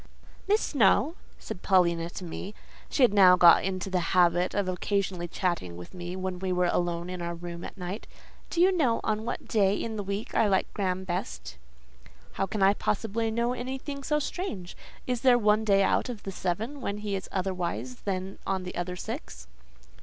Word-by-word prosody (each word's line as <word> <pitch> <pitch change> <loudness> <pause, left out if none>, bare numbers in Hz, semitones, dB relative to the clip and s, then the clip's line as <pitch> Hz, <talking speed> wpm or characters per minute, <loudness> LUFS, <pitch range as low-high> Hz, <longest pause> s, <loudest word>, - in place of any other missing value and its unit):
"Miss 420 +2 +3
Snowe," 275 +4 +3 0.2
said 180 - -8
Paulina 170 -3 +3
to 185 - -8
me 185 +4 -6 0.3
(she 275 - +2
had 240 - +5
now 185 -3 +8
got 175 -1 +7
into 185 0 -2
the 185 -1 0 0.2
habit 175 0 +3
of 200 -2 0
occasionally 185 -1 -1
chatting 170 - -2
with 90 - -10
me 175 0 -6
when 185 -1 -3
we 190 0 -2
were 180 0 +2
alone 175 0 -1
in 180 -1 -5
our 170 0 -3
room 170 0 -7
at - - -8
night), 185 +3 -5 0.4
"do 335 - -3
you 365 +2 +6
know 255 -9 +2
on 215 0 -1
what 240 - -4
day 200 -3 +3
in 220 +1 -3
the 205 - -2
week 200 +2 -4
I 220 - +3
like 190 -2 +1
Graham 190 -2 -1
best?" 75 - -4 0.7
"How 195 - -1
can 200 +1 -1
I 195 +1 +6
possibly 225 +2 -1
know 235 +2 0
anything 265 +3 -5
so 300 +2 0
strange? 275 - -4 0.3
Is 250 -2 -1
there 255 -2 +6
one 215 -1 +3
day 195 -2 +4
out 225 - +1
of 230 -4 -6
the 195 - -4
seven 215 +10 -3
when 200 -4 -2
he 210 -1 -3
is 190 - -5
otherwise 185 +6 -2
than 190 -2 -4
on 190 -1 -1
the 180 - -6
other 180 +1 -3
six?" - - -7
195 Hz, 195 wpm, -28 LUFS, 180-220 Hz, 0.7 s, now